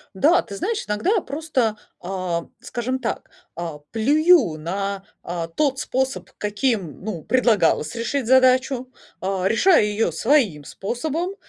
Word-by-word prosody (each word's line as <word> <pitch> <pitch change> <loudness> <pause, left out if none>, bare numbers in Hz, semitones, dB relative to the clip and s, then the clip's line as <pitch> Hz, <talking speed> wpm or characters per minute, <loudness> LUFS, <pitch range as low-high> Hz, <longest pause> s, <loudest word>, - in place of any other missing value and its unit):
Да, 310 - +4
ты 200 - -9
знаешь, 430 - -2
иногда 350 - +1
просто, 275 -7 -1 0.3
а, 180 -2 -3
скажем 255 0 -3
так, 235 -3 -4 0.3
а, 165 -3 -5
плюю 285 - +4
на, 195 +5 -3 0.2
а, 170 -1 -4
тот 270 - 0
способ, 260 -10 -2
каким, 205 - -2
ну, 190 -7 -5
предлагалось 205 -11 +2
решить 240 +3 -2
задачу, 255 0 +3 0.3
а, 190 -1 -1
решая 275 - +5
ее 210 -2 0
своим 215 - +2
способом. 315 - -3
225 Hz, 125 wpm, -22 LUFS, 185-270 Hz, 0.3 s, решая